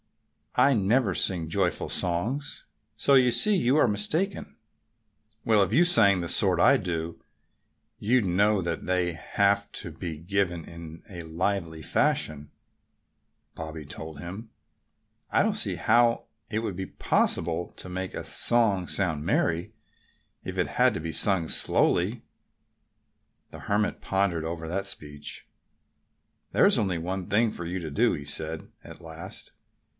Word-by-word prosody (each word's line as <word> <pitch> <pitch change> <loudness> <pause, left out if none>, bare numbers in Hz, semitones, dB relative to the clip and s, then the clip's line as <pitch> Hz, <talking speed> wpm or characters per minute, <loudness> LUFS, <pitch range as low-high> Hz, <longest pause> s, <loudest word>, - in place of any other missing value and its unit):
"I 140 - +5
never 110 0 +2
sing 85 -4 0
joyful 90 +2 0
songs. 110 +12 -2 0.3
So 140 - +2
you 130 -2 +5
see 210 - +4
you 140 -5 +2
are - - +4
mistaken." 155 - -1 0.9
"Well, 110 -2 +4
if 95 - -3
you 160 +10 +4
sang 100 - +6
the 85 - -3
sort - - +3
I - - +6
do 85 -2 -4 0.8
you'd 120 +1 +2
know 100 +3 +2
that 85 -1 -3
they 90 -1 0
have 100 +4 0
to 85 - -5
be 80 -1 -6
given 85 0 -2
in 85 -1 -11
a 90 -3 -5
lively 85 0 -3
fashion," 75 -1 -1 1.0
Bobby 80 -1 -7
told 75 +1 -8
him. 95 +8 -8 0.8
"I - - +3
don't - - +1
see - - +1
how 120 +1 +2 0.2
it 110 - -1
would 110 -5 -4
be 95 +1 -5
possible 85 +1 0
to - - -9
make 90 +1 -5
a - - -5
song 105 -7 +1
sound 85 -6 0
merry 85 +2 0 0.7
if - - -6
it - - +1
had - - +2
to - - -2
be 80 0 -5
sung 95 -5 +2
slowly." 100 +9 +2 1.3
The - - -10
Hermit 105 +1 -1
pondered 95 -4 0
over 80 0 -5
that 95 +4 -3
speech. 75 -6 -8 1.0
"There's - - +4
only 95 -4 0
one 90 +2 -4
thing 110 +2 +2
for 85 - -7
you 90 +2 -3
to 80 -3 -6
do," - - +2
he 70 - -6
said 80 +2 -3
at - - -11
last. 80 -1 -9
90 Hz, 145 wpm, -26 LUFS, 80-105 Hz, 1.3 s, sang